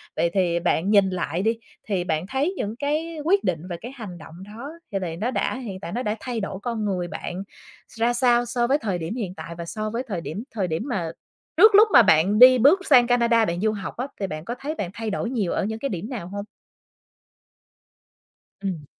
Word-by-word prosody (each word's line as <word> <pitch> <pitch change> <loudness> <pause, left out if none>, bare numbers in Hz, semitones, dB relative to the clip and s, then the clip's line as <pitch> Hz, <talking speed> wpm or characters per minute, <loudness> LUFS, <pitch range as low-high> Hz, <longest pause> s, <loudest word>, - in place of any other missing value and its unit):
Vậy 170 - +1
thì 175 -3 +1
bạn 175 +1 +1
nhìn 200 -2 +5
lại 180 -2 -2
đi 225 +3 +1 0.3
thì 195 -4 0
bạn 160 0 -2
thấy 275 - 0
những 210 +2 -3
cái 305 +5 -2
quyết 390 +6 +3
định 170 -3 0
và 175 - -4
cái 240 - -7
hành 210 -8 -8
động 160 -1 -12
đó 230 +8 -8 0.2
thì 195 - -1
lại 170 -3 -4
nó 225 +7 -1
đã - - -1
hiện 210 -8 -6
tại 185 - -7
nó 245 +5 -2
đã 210 -1 -1
thay 245 -1 -4
đổi 195 -2 -4
con 225 -1 -3
người 185 -3 -1
bạn 180 +2 -5 0.5
ra 235 +2 +2
sao 240 -1 +3
so 240 0 0
với 275 +3 +3
thời 205 -10 -2
điểm 165 +5 -4
hiện 205 -8 -4
tại 170 - -8
và 170 - -5
so 215 +5 -4
với 230 +3 -3
thời 190 -7 -3
điểm 190 +7 -5
thời 200 -5 -1
điểm 160 +4 -2
mà 185 - -2 0.5
trước 435 -1 +8
lúc 430 +2 +8
mà - - +10
bạn 195 +1 +4
đi 255 +1 +9
bước 310 - +4
sang 250 -4 +6
Canada 235 -2 +3
bạn 175 -2 -2
du 215 0 +2
học 205 -2 -6
á 250 +3 -2
thì 195 - -1
bạn 155 -2 -6
có 240 - -4
thấy 300 +3 -4
bạn 195 - -3
thay 225 +1 -4
đổi 210 +3 -2
nhiều 220 -9 -1
ở - - 0
những 220 +1 -4
cái 275 - -2
điểm 195 +2 -5
nào 220 -10 -5
hông? 200 +2 -6 2.2
Ừm. 180 -7 -4
215 Hz, 235 wpm, -24 LUFS, 180-245 Hz, 2.2 s, mà